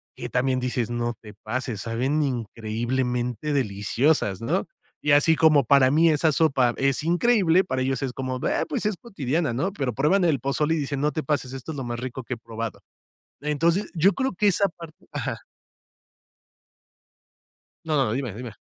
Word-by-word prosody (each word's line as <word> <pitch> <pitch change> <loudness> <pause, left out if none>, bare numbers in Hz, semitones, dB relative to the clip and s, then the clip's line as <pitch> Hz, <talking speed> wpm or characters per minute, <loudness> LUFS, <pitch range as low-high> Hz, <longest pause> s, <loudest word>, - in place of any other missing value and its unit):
que - - -6
también 130 +1 +1
dices: 125 -2 -1
"No 120 0 -1
te 105 -2 -12
pases, 115 +1 -4
saben 130 +7 0
increíblemente 120 +2 -2
deliciosas", 105 -1 +1
¿no? 115 - -1 0.3
Y 150 - +1
así 150 +3 +5
como 155 -3 +5
para 135 +1 +5
mí 165 +3 +5
esa 155 +1 +3
sopa 135 -6 +2
es 135 -1 +1
increíble, 180 0 +3
para 130 -8 -2
ellos 130 -1 -1
es 130 -2 -2
como: 130 -1 -3
"Ah, - - +1
pues 260 -8 -2
es 210 -1 +1
cotidiana", 160 - -2
¿no? 170 +11 -1
Pero, 135 -8 -2
prueban 155 - +2
el 155 -6 +2
pozole 150 +5 0
y - - -1
dicen: 140 -2 -2
"No 150 +1 +2
te 155 -1 -3
pases, 135 -2 -1
esto 135 +4 -6
es - - -7
lo 135 - -3
más 120 -1 -4
rico 130 +1 -5
que 125 - -4
he - - -13
probado". 115 0 -6 0.6
Entonces, 165 +6 0
yo 180 +4 +4
creo 265 +5 -1
que 205 +3 +2
esa 200 +1 +2
parte 165 -2 -13
Ajá. - - -4 2.4
No, 155 -1 0
no, 110 - 0
dime, 130 -4 -3
dime. 115 -1 -7
135 Hz, 180 wpm, -25 LUFS, 120-160 Hz, 2.4 s, así